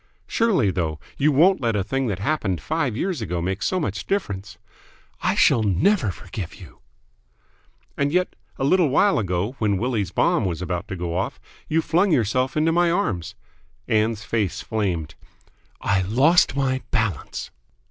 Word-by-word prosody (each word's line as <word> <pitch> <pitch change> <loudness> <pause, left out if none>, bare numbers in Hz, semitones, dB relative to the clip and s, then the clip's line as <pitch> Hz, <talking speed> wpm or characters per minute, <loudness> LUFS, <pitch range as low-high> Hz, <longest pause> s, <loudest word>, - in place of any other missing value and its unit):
"Surely, 190 - +2
though, 80 -4 -2 0.2
you 150 +2 +3
won't 170 +5 +4
let 115 -3 +1
a 100 - +1
thing 135 +5 -1
that 100 -5 -1
happened 100 - -1
five 150 -8 -1
years 175 -3 -2
ago 90 -5 -2
make 95 +4 -2
so 185 - 0
much 155 - -3
difference?" 105 - -3 0.6
"I - - +1
shall 115 - +4
never 110 - +2
forgive 90 0 -7
you!" - - -14 1.2
"And 140 0 0
yet, 180 +2 0 0.2
a - - -2
little 165 +2 +4
while 195 +6 +3
ago, 95 +4 -2
when 105 -3 +1
Willie's 110 -4 -1
bomb - - +2
was 85 -4 -2
about 90 +2 -3
to 100 - -5
go 85 -1 -3
off, 95 - -2 0.3
you 160 +1 +1
flung 180 +4 +2
yourself 130 +1 +1
into 160 +2 +3
my 175 +1 +3
arms!" 170 - -1 0.5
Ann's 110 -1 +1
face 105 -3 -1
flamed. 90 -8 -2 0.7
"I 100 -2 +2
lost 135 - +3
my 130 -1 0
balance." 105 -9 -2
110 Hz, 160 wpm, -23 LUFS, 95-155 Hz, 1.2 s, won't